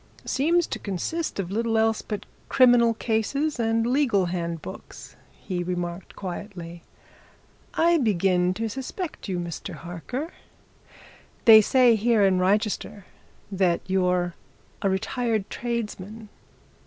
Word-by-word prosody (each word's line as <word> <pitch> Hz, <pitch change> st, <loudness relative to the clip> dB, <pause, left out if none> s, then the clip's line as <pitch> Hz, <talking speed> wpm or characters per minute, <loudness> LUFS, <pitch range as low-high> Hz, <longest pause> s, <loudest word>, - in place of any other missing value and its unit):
"Seems 335 Hz, +5 st, +2 dB
to -, -, -5 dB
consist 205 Hz, -, -3 dB
of 185 Hz, -2 st, -3 dB
little 225 Hz, +1 st, 0 dB
else 220 Hz, 0 st, +2 dB
but 210 Hz, -3 st, -5 dB, 0.2 s
criminal 240 Hz, -3 st, +5 dB
cases 245 Hz, +7 st, -1 dB
and 225 Hz, 0 st, +1 dB
legal 240 Hz, -7 st, +2 dB
handbooks," 170 Hz, -, -6 dB, 0.2 s
he 180 Hz, -2 st, -5 dB
remarked 175 Hz, 0 st, -4 dB
quietly. 175 Hz, -3 st, -7 dB, 0.9 s
"I 335 Hz, 0 st, +4 dB
begin 185 Hz, -5 st, +2 dB
to 225 Hz, +3 st, -2 dB
suspect 270 Hz, -, -6 dB
you, 185 Hz, -, -1 dB
Mr. 170 Hz, +1 st, -5 dB
Harker. 180 Hz, -, -6 dB, 1.1 s
They 220 Hz, -2 st, +10 dB
say 250 Hz, +2 st, +5 dB
here 220 Hz, 0 st, +3 dB
in 185 Hz, -1 st, +3 dB
Wrychester 200 Hz, +1 st, 0 dB, 0.5 s
that 185 Hz, -3 st, +1 dB
you're 180 Hz, -2 st, +1 dB, 0.5 s
a 200 Hz, -, +2 dB
retired 220 Hz, +2 st, -1 dB
tradesman. 220 Hz, -2 st, -5 dB
210 Hz, 115 wpm, -25 LUFS, 180-235 Hz, 1.1 s, They